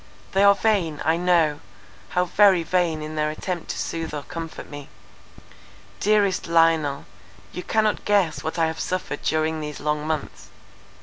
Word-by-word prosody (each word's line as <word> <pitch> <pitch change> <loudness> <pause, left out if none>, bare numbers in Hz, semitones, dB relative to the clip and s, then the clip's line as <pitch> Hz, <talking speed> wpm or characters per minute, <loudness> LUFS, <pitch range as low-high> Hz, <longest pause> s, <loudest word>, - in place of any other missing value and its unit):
They 195 +1 +3
are 200 0 +7
vain, 185 -10 0
I 160 +2 +3
know; 170 -4 +2 0.6
how 180 - +4
very 190 -2 +4
vain 165 -3 0
in 155 0 -6
their 150 -1 0
attempt 170 +3 -5
to - - -3
soothe 165 -2 -4
or 145 - -5
comfort 165 0 -7
me. 145 -1 -9 1.1
Dearest 205 -2 +2
Lionel, 165 -4 +2 0.5
you 180 - -5
cannot 215 +3 0
guess 200 -6 +1
what 160 - -4
I 165 - +3
have 160 0 -3
suffered 180 -5 -3
during 155 0 0
these 150 -1 -6
long 150 0 -2
months. 155 -2 -4
165 Hz, 160 wpm, -23 LUFS, 155-185 Hz, 1.1 s, are